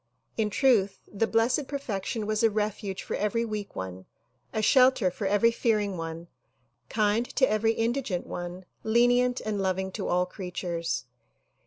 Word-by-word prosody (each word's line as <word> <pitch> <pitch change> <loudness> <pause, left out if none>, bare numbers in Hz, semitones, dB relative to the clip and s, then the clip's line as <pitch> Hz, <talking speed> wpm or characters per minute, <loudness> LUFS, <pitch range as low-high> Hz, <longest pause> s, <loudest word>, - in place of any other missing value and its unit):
In 220 -2 0
truth 210 -4 +3 0.2
the 220 +3 +1
Blessed 240 +5 +2
Perfection 225 -5 -3
was 215 0 0
a 225 - +5
refuge 210 -2 -2
for - - -3
eveiy 230 +3 0
weak 210 -2 -5
one, 95 0 -6 0.4
a 220 - -2
shelter 250 -4 +4
for 195 +2 -3
every 205 +4 +4
fearing 210 -4 0
one, 165 0 -6 0.6
kind 215 +1 +2
to 260 - +5
every 220 +1 +2
indigent 225 -5 -1
one, 175 +1 -6 0.2
lenient 245 +2 +3
and 210 -2 -2
loving 190 0 -1
to - - -4
all 180 +1 +2
creatures. 175 -5 -4
210 Hz, 150 wpm, -28 LUFS, 185-230 Hz, 0.6 s, a